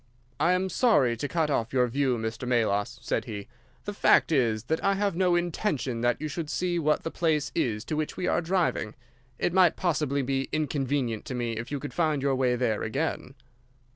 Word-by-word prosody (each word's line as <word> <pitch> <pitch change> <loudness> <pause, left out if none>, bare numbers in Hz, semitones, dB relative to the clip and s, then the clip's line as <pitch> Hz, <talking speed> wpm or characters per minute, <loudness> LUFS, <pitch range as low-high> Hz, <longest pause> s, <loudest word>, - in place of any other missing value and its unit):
"'I 175 - +3
am 185 +1 0
sorry 155 - +3
to 130 +5 -3
cut 160 -1 0
off 115 -4 -1
your 125 -1 +4
view, 130 0 0
Mr. 110 +2 -4
Melas,' 110 -2 +1
said - - -1
he. 105 -3 -6 0.4
'The 205 - -4
fact 200 - +4
is 115 -7 +2
that 160 +6 -2
I 195 - +3
have 200 -2 0
no 180 -1 +3
intention 155 - -1
that 120 0 +1
you 155 - -3
should 155 0 -5
see 175 0 -1
what 155 -1 +1
the 165 - -3
place 155 -4 0
is 105 -3 -1
to 155 - -3
which 155 0 -3
we 180 - -2
are - - +1
driving. 170 - 0 0.4
It 175 - 0
might 180 -3 +5
possibly 150 -5 0
be 135 +1 -1
inconvenient 140 -6 -1
to 130 - -5
me 120 -1 -2
if 115 +4 -6
you 145 - -2
could 145 - -7
find 155 -5 0
your 140 -1 +2
way 130 -2 +2
there 115 -4 0
again. 135 +3 -3
140 Hz, 205 wpm, -27 LUFS, 120-165 Hz, 0.4 s, might